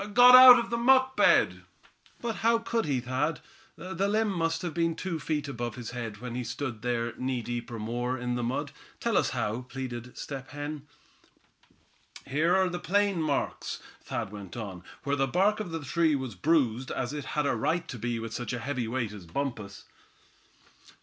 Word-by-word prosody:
"Got 245 +1 +9
out 255 0 +12
of 235 -1 -2
the 235 - +1
muck 260 +2 +4
bed." - - +4 0.6
"But 230 -2 -3
how 230 +1 +3
could 230 -1 -1
he, 135 -4 0
Thad? 130 +6 -1 0.4
That 185 +3 -2
limb 215 0 +1
must 165 -2 -1
a 175 - -2
been 165 +1 0
two 170 -3 -3
feet 150 -1 -2
above 120 -4 -4
his 120 -2 -7
head 115 -4 -5
when 125 +2 -7
he 125 +1 -3
stood 120 -1 -5
there 120 -1 -1
knee 130 -2 -2
deep 120 0 -4
or 115 - -6
more, 120 +4 -2
in 125 0 -2
the 120 - -1
mud. 120 +2 -2 0.3
Tell - - 0
us - - +3
how?" 110 +4 -2
pleaded 125 -2 -7
Step 135 -2 -6
Hen. 145 0 -6 1.4
"Here 155 +6 +2
are 190 0 +3
the 175 0 -4
plain 200 -1 +1
marks," 150 -3 -2 0.2
Thad - - -4
went 100 -1 -9
on, 95 -6 -6 0.2
"where 140 0 0
the 135 -1 +1
bark 195 +8 +2
of 210 -4 -4
the 165 -2 -5
tree 160 +1 +2
was 130 -4 -4
bruised, 130 - +1
as 130 +2 -3
it 145 -2 -5
had 150 - +2
a 140 - +1
right 165 +9 0
to 125 -7 -7
be 120 +1 -2
with 115 0 -5
such 120 0 -4
a 125 - -2
heavy 130 -2 -3
weight 115 -2 -2
as 100 -5 -10
Bumpus." 105 -2 -4
135 Hz, 195 wpm, -28 LUFS, 120-170 Hz, 1.4 s, out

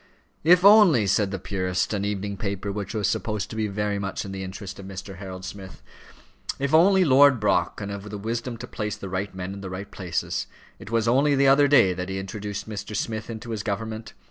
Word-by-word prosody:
"If 180 +3 +6
only," 200 - +7
said 100 +1 +2
the 95 - -3
Purist, 90 +1 -2
an 100 -1 -1
evening 100 0 -3
paper 100 -1 -3
which 100 +1 -5
was 105 -2 +1
supposed 105 -2 -2
to - - -6
be 110 -1 0
very 105 0 -2
much 100 0 -4
in 95 - -6
the 95 0 -5
interest 95 +1 -7
of 95 - -9
Mr. 95 0 -8
Harold 95 -1 -8
Smith, 95 -2 -9 0.7
"if 140 +2 -2
only 185 +3 +6
Lord 140 -2 +6
Brock 105 - +1
can 100 -1 -5
have 100 +1 -6
the 105 - -5
wisdom 115 +3 -4
to - - -7
place 105 -3 -4
the 95 - -7
right 95 +1 -3
men 95 +1 -5
in 100 - -8
the 95 - -6
right 95 +2 -7
places. 90 -4 -3 0.3
It - - -10
was 115 0 +1
only 140 +4 +4
the 140 0 +4
other 140 +1 +6
day 130 -10 +5
that 90 +1 -5
he 95 - -3
introduced 100 +1 -5
Mr. 105 0 -6
Smith 110 +2 -3
into 115 +1 -6
his 110 -2 -2
government. 110 +2 -4
105 Hz, 220 wpm, -25 LUFS, 95-115 Hz, 0.7 s, only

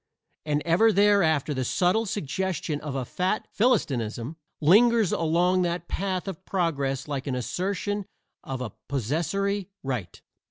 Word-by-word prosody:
And 150 0 0
ever 180 +7 +5
thereafter 195 -8 +3
the 130 -1 -1
subtle 185 - +1
suggestion 175 -3 -2
of 145 -3 -5
a 130 -2 -2
fat 185 - -1
philistinism 135 - 0 0.2
lingers 220 +6 +5
along 175 +3 +2
that 175 -1 -1
path 190 0 -2
of 190 -1 -6
progress 140 -9 -1
like 145 -1 -4
an 130 - -1
assertion 190 - -2 0.4
of 130 -1 -5
a 115 -5 -5
possessory 175 - -1
right. 125 -9 -4
170 Hz, 130 wpm, -26 LUFS, 140-195 Hz, 0.4 s, ever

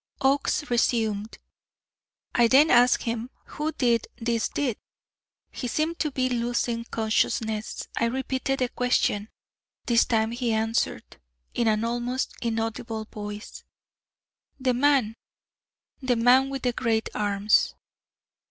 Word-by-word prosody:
Oakes 280 +2 +1
resumed: 220 -3 0 1.0
"I 240 -1 +5
then 280 +6 +5
asked 245 +1 +5
him, 230 +1 -3 0.2
'Who 305 +1 -3
did 235 -6 +1
this 235 -1 -1
deed?' 255 -7 -2 0.7
He 250 - -5
seemed 315 +7 -1
to 305 - 0
be 260 -2 0
losing 235 -1 -1
consciousness. 220 -1 -1
I - - +1
repeated 265 +2 -1
the 250 - +1
question. 240 -4 0 0.6
This 235 -1 +4
time 220 -1 +1
he 235 -1 -1
answered, 225 +1 -1 0.4
in 235 - 0
an 215 0 +2
almost 240 +2 -2
inaudible 225 -1 -3
voice: 210 0 -7 1.0
'The 255 -1 +1
man 255 -4 +2 0.8
the 255 -2 +1
man 250 +3 +4
with 270 -1 -5
the 245 -1 +1
great 225 -2 0
arms.'" 205 0 +2
235 Hz, 120 wpm, -26 LUFS, 225-255 Hz, 1.0 s, I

